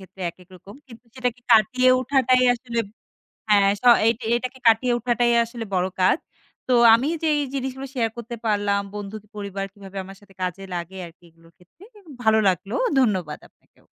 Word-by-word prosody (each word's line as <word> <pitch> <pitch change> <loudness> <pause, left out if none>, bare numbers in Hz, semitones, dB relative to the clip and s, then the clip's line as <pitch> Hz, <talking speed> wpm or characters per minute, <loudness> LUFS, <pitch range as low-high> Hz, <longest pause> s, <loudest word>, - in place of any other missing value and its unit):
ক্ষেত্রে 190 0 -16
একেক 180 +2 -21
রকম। 195 +3 -14
কিন্তু 235 0 -15
সেটাকে 250 -2 -3
কাটিয়ে 255 +4 +4
উঠাটাই 255 -1 +2
আসলে 235 -1 -6 0.7
হ্যাঁ, 200 -1 +5
স - - -33 0.2
এটা 230 +1 0
এটাকে 255 +2 -4
কাটিয়ে 235 +2 +4
উঠাটাই 240 0 +1
আসলে 230 -1 -7
বড় 180 0 +1
কাজ। 185 - +4 0.5
তো 255 - +2 0.2
আমি 240 +5 +3 0.2
যেই 300 -2 +2
জিনিসগুলো 265 0 -4
শেয়ার 230 -3 0
করতে 235 0 -7
পারলাম, 205 -2 +1
বন্ধু, 205 0 -6 0.2
পরিবার, 200 -1 -5
কীভাবে 195 -1 -11
আমার 195 +1 -12
সাথে 200 -1 -20
কাজে 185 +1 -3
লাগে 175 +2 -6
আরকি 170 +1 -16
এগুলোর 165 +1 -23
ক্ষেত্রে 185 - -21
এ - - -15 0.2
ভালো 220 -1 +4
লাগলো 190 +4 -1 0.2
ধন্যবাদ 185 - 0
আপনাকেও। - - -33
220 Hz, 165 wpm, -23 LUFS, 195-250 Hz, 0.7 s, হ্যাঁ